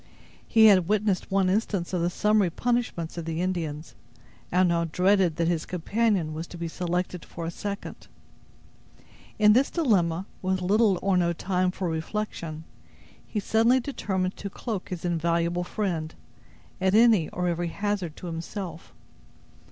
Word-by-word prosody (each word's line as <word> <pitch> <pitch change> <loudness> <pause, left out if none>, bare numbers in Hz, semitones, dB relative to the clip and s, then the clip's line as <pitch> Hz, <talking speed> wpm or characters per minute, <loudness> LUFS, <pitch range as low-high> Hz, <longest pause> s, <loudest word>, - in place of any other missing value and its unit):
He 220 -2 +6
had 190 -5 +6
witnessed 205 -2 0
one 195 -1 +2
instance 190 -2 -1
of 180 - 0
the 170 - +1
summary 210 0 +2
punishments 200 -5 -2
of 165 - -6
the 165 0 -3
Indians, 165 -4 -3 0.6
and 180 0 +3
now 170 -1 +1
dreaded 180 +1 +2
that 165 0 0
his 165 -2 -1
companion 185 -2 0
was 160 +2 -5
to 175 - -10
be 170 0 -3
selected 180 +1 -3
for 170 - -7
a 165 - -3
second. 200 +3 -6 1.3
In 210 0 +6
this 260 +5 +3
dilemma, 190 - +1 0.2
with 185 0 0
little 200 +2 +3
or 195 -2 +2
no 170 -1 +2
time 185 +1 0
for 185 0 -3
reflection, 160 -1 -4 0.6
he 215 - -2
suddenly 225 +5 +3
determined 190 -8 -2
to 200 - -5
cloak 210 -1 -5
his 180 -2 -5
invaluable 170 +1 0
friend, 175 -5 -3 0.7
at 190 +1 +3
any 220 -7 +5
or 180 0 -2
every 175 0 -1
hazard 195 -3 -2
to - - -10
himself. 170 +1 -6
180 Hz, 150 wpm, -26 LUFS, 170-205 Hz, 1.3 s, He